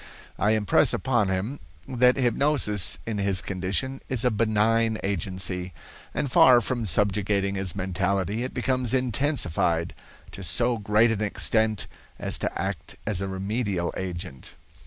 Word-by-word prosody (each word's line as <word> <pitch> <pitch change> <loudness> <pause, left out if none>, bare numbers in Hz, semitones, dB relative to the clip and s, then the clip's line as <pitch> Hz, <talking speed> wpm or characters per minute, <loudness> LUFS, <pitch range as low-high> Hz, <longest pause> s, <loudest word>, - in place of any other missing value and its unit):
I 105 +2 +2
impress 105 -3 +2
upon 120 -6 0
him 100 +9 -3 0.3
that 125 0 +3
hypnosis 120 - +4
in 110 -2 -3
his 100 -2 +1
condition 100 +10 -3
is 125 -2 0
a 125 - +3
benign 110 +1 +1
agency, 95 -2 -3 0.4
and 145 -3 -3
far 125 -1 +7
from 120 -2 -3
subjugating 100 +1 0
his 95 -3 -1
mentality, 95 +2 -1
it 130 - -4
becomes 130 -1 0
intensified 110 - +1 0.4
to - - -8
so 120 +6 0
great 105 +3 +3
an 110 -2 -2
extent 110 +1 0 0.3
as - - -2
to - - -3
act - - -5
as 105 -3 -1
a 95 - -2
remedial 95 -1 -2
agent. 90 -6 -7
105 Hz, 135 wpm, -25 LUFS, 95-120 Hz, 0.4 s, far